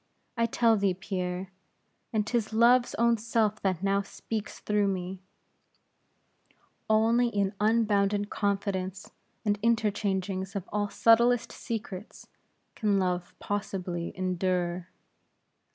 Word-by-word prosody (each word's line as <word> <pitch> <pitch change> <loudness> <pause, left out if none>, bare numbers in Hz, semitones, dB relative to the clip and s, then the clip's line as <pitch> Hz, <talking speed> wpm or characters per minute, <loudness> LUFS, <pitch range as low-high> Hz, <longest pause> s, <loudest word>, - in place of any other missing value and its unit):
I 230 -1 +2
tell 230 -1 +3
thee, 195 -2 +1
Pierre 185 -1 -4 0.6
and 215 -2 +1
'tis 225 -1 -1
Love's 240 +2 +4
own 235 0 +3
self 220 -1 0
that 185 -2 -1
now 195 0 +2
speaks 205 +1 -6
through 210 -1 +1
me 185 -1 -3 1.7
only 225 +3 +4
in 200 -3 0
unbounded 205 -2 +2
confidence 195 -2 -2 0.3
and 205 -1 +1
interchangings 200 -4 0
of 195 -2 -4
all 205 -1 0
subtlest 235 +2 +4
secrets, 210 -3 -6 0.5
can 210 -3 +1
Love 180 -2 -1
possibly 185 -4 -3
endure. 180 -1 -1
205 Hz, 105 wpm, -28 LUFS, 190-220 Hz, 1.7 s, Love's